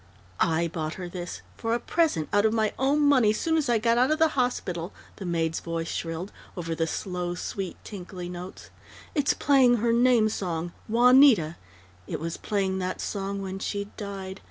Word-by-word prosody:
"I 165 +1 +2
bought 155 -1 -4
her 180 -2 -6
this 175 0 -6
for 225 0 -1
a - - -1
present, 300 - +1
out 205 0 +4
of 220 0 +3
my 220 -2 +1
own 280 +3 +2
money, 270 -7 +5
soon 320 +9 0
as 305 -5 +1
I 235 - +4
got 230 +2 +2
out 255 - +4
of 310 - +2
the 320 0 +4
hospital!" 200 - -1 0.3
the 195 - -6
maid's 165 -1 0
voice 165 0 -4
shrilled, 165 +4 -4 0.3
over 165 -2 -3
the 165 0 -1
slow, 180 0 -3
sweet, 190 +1 -5
tinkly 185 -3 -7
notes. 180 +1 -8 0.4
"It's 290 -4 +2
playing 265 -4 +4
her 230 +1 +1
name 240 -2 +4
song 175 -5 -3 0.2
Juanita. 240 - +6 0.5
It - - -3
was 165 +2 -4
playing 195 -2 -1
that 185 0 -3
song 200 -1 -3
when 190 0 -5
she 200 +1 -3
died. 195 -2 -6
195 Hz, 180 wpm, -27 LUFS, 175-240 Hz, 0.5 s, Juanita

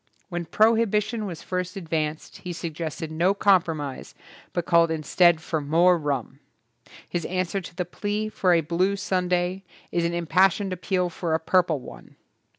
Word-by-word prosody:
When 175 -2 -3
prohibition 220 +2 +2
was 170 -4 -7
first 180 0 -3
advanced 160 -3 -3
he 180 - -6
suggested 160 -1 -5
no 175 +5 +2
compromise 165 -9 +1 0.4
but 175 - -2
called 170 -1 +4
instead 160 +1 +3
for 160 -1 -2
more 170 +5 +4
rum. 140 -4 -3 0.7
His 175 -1 -3
answer 185 +1 -1
to 170 - -11
the 180 0 -2
plea 205 +4 -3
for 195 -3 +1
a 165 - +4
blue 175 +5 0
Sunday 180 -1 -1 0.3
is 170 - 0
an 170 0 0
im 170 0 -2
passioned 190 +3 +3
appeal 180 0 -1
for 165 -1 -1
a - - 0
purple 170 -2 +2
one. - - -12
175 Hz, 155 wpm, -25 LUFS, 160-190 Hz, 0.7 s, called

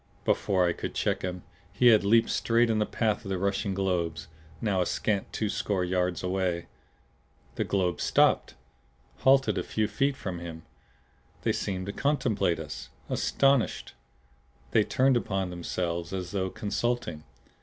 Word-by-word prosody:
Before 95 -3 +2
I 85 - +1
could - - -6
check - - 0
him, 90 -1 -4 0.3
he 120 +6 +5
had 110 -3 +6
leaped 115 +3 +4
straight 115 0 +2
in 110 - +1
the 105 - +1
path 110 -3 0
of 100 - -7
the 95 - -1
rushing 100 +1 -1
globes, 85 -4 -1 0.3
now 100 -4 +1
a - - +1
scant 100 -3 -1
twoscore 100 -3 -1
yards 90 0 0
away. 90 -2 -1 0.9
The - - -2
globes 90 -3 0
stopped - - +3 0.6
halted 135 0 +4
a - - -2
few 110 -1 -1
feet 135 +6 0
from 95 -8 -5
him. 80 -1 -8 0.8
They - - +2
seemed 95 -2 -3
to 100 - -4
contemplate 125 - +1
us, 75 -2 -7 0.2
astonished. 135 -3 +1 0.8
They - - +4
turned 130 -1 +3
upon 95 -5 -2
themselves, 85 0 -3
as 90 -2 -4
though 95 -2 -1
consulting. 105 -6 -2
95 Hz, 150 wpm, -28 LUFS, 90-110 Hz, 0.9 s, had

